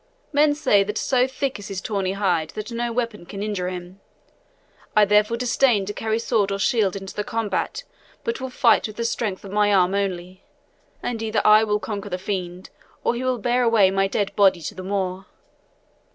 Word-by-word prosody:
Men 290 Hz, 0 st, +4 dB
say 230 Hz, -9 st, +3 dB
that 210 Hz, +2 st, -4 dB
so 255 Hz, -1 st, +2 dB
thick 265 Hz, -2 st, -3 dB
is 205 Hz, -, -8 dB
his 195 Hz, -2 st, -4 dB
tawny 195 Hz, -2 st, -2 dB
hide 180 Hz, -6 st, 0 dB
that 215 Hz, +3 st, -6 dB
no 235 Hz, 0 st, -2 dB
weapon 230 Hz, -4 st, -3 dB
can 200 Hz, +3 st, -6 dB
injure 200 Hz, -4 st, -2 dB
him. 180 Hz, +1 st, -8 dB, 0.9 s
I 210 Hz, -1 st, +6 dB
therefore 210 Hz, +3 st, +3 dB
disdain 240 Hz, -3 st, +2 dB
to 205 Hz, -, -4 dB
carry 220 Hz, +1 st, -1 dB
sword 220 Hz, -3 st, 0 dB
or 195 Hz, -, -1 dB
shield 200 Hz, -2 st, +1 dB
into 195 Hz, -1 st, -7 dB
the 210 Hz, -, -3 dB
combat, 225 Hz, -, -2 dB, 0.4 s
but 465 Hz, -1 st, -3 dB
will 260 Hz, -, -4 dB
fight 250 Hz, -, +3 dB
with 215 Hz, -, -10 dB
the 235 Hz, -, -3 dB
strength 215 Hz, -4 st, -2 dB
of 195 Hz, -, -8 dB
my 205 Hz, 0 st, +2 dB
arm 185 Hz, -1 st, +3 dB
only, 185 Hz, -1 st, -3 dB, 0.6 s
and 230 Hz, -2 st, -3 dB
either 220 Hz, -1 st, -1 dB
I 215 Hz, +1 st, +7 dB
will 210 Hz, -1 st, 0 dB
conquer 205 Hz, -2 st, -5 dB
the 180 Hz, -, -2 dB
fiend 185 Hz, -1 st, -5 dB, 0.3 s
or -, -, +2 dB
he 240 Hz, +1 st, -4 dB
will 255 Hz, -1 st, 0 dB
bear 245 Hz, +2 st, +1 dB
away 225 Hz, -5 st, +4 dB
my 195 Hz, 0 st, +2 dB
dead 200 Hz, 0 st, -2 dB
body 190 Hz, -4 st, +4 dB
to 180 Hz, -, -5 dB
the 185 Hz, -, -8 dB
moor. 190 Hz, 0 st, -3 dB
205 Hz, 200 wpm, -23 LUFS, 195-230 Hz, 0.9 s, I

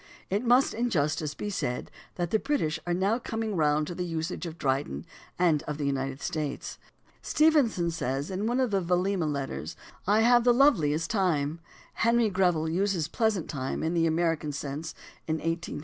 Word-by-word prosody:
It 205 Hz, +4 st, +1 dB
must 250 Hz, +2 st, +4 dB
in 240 Hz, +2 st, 0 dB
justice 150 Hz, -3 st, 0 dB
be 205 Hz, -, -4 dB
said 125 Hz, -10 st, -3 dB, 0.2 s
that 175 Hz, -2 st, -2 dB
the 220 Hz, -, +3 dB
British 175 Hz, -, -1 dB
are 175 Hz, -, +1 dB
now 200 Hz, +6 st, +1 dB
coming 225 Hz, -3 st, -3 dB
round 150 Hz, -2 st, +2 dB
to 175 Hz, -, -5 dB
the 180 Hz, -, -3 dB
usage 165 Hz, 0 st, -3 dB
of 165 Hz, 0 st, -8 dB
Dryden 130 Hz, -, -1 dB, 0.3 s
and 165 Hz, -4 st, +3 dB
of 150 Hz, -1 st, -3 dB
the 145 Hz, -, -2 dB
United 135 Hz, 0 st, -2 dB
States. 150 Hz, -3 st, -4 dB, 0.4 s
Stevenson 275 Hz, -, +3 dB
says 140 Hz, 0 st, -2 dB
in 195 Hz, +3 st, -2 dB
one 245 Hz, +2 st, +1 dB
of 255 Hz, -4 st, +1 dB
the 195 Hz, -1 st, +2 dB
Vailima 180 Hz, -2 st, +1 dB
Letters: 135 Hz, -, -4 dB, 0.2 s
" -, -, -27 dB
I -, -, +4 dB
have 240 Hz, +1 st, +5 dB
the 245 Hz, 0 st, +5 dB
loveliest 165 Hz, -, +3 dB
time." 165 Hz, -7 st, 0 dB, 0.3 s
Henry 230 Hz, -1 st, +2 dB
Greville 175 Hz, -4 st, +2 dB
uses 180 Hz, -1 st, 0 dB
"pleasant 210 Hz, -1 st, 0 dB
time" 135 Hz, -3 st, -3 dB
in 160 Hz, +1 st, 0 dB
the 165 Hz, -1 st, +2 dB
American 165 Hz, -2 st, 0 dB
sense 145 Hz, +2 st, -5 dB, 0.3 s
in 160 Hz, -, +1 dB
1854 165 Hz, +2 st, -3 dB
(vol. -, -, -5 dB
170 Hz, 185 wpm, -28 LUFS, 150-205 Hz, 0.4 s, have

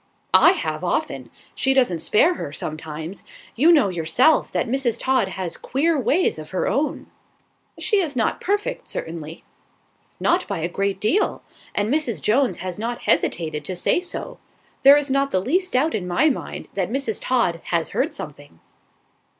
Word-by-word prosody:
"I -, -, +7 dB
have, -, -, -3 dB
often; -, -, -2 dB, 0.2 s
she 265 Hz, 0 st, +1 dB
doesn't 240 Hz, -11 st, +2 dB
spare 325 Hz, +12 st, +3 dB
her, 145 Hz, -, -6 dB
sometimes. 155 Hz, +4 st, -6 dB, 0.3 s
You 310 Hz, +8 st, +5 dB
know, 290 Hz, -12 st, +5 dB
yourself, 185 Hz, -, +2 dB
that -, -, -1 dB
Mrs. 250 Hz, -1 st, 0 dB
Todd 260 Hz, -6 st, +2 dB
has 185 Hz, -2 st, -4 dB
queer 315 Hz, +6 st, 0 dB
ways 290 Hz, -, +1 dB
of 155 Hz, -, -9 dB
her 185 Hz, -, -1 dB
own." 295 Hz, +2 st, -1 dB, 0.7 s
"She 420 Hz, -, +1 dB
is 325 Hz, -8 st, 0 dB
not 225 Hz, -3 st, 0 dB
perfect, 410 Hz, +2 st, -2 dB
certainly." 160 Hz, -1 st, -6 dB, 0.8 s
"Not -, -, +1 dB
by -, -, -3 dB
a 165 Hz, -, 0 dB
great 195 Hz, +2 st, -2 dB
deal; 335 Hz, -, +1 dB, 0.3 s
and 210 Hz, +5 st, 0 dB
Mrs. 255 Hz, -, 0 dB
Jones 220 Hz, -, +2 dB
has 185 Hz, +1 st, -5 dB
not 235 Hz, +2 st, -4 dB
hesitated 155 Hz, -3 st, 0 dB
to 185 Hz, -, -3 dB
say 180 Hz, -, +1 dB
so. 360 Hz, -, -7 dB, 0.4 s
There 280 Hz, +2 st, +8 dB
is 290 Hz, -2 st, -1 dB
not 275 Hz, 0 st, +2 dB
the 185 Hz, -, +1 dB
least 365 Hz, -, 0 dB
doubt 285 Hz, +6 st, +2 dB
in 190 Hz, -4 st, -2 dB
my 295 Hz, -, +3 dB
mind, -, -, -6 dB
that 190 Hz, -2 st, -1 dB
Mrs. 260 Hz, -2 st, -1 dB
Todd 205 Hz, -10 st, +1 dB
has 170 Hz, -2 st, -1 dB
heard -, -, 0 dB
something." 145 Hz, -, -9 dB
225 Hz, 165 wpm, -22 LUFS, 175-280 Hz, 0.8 s, There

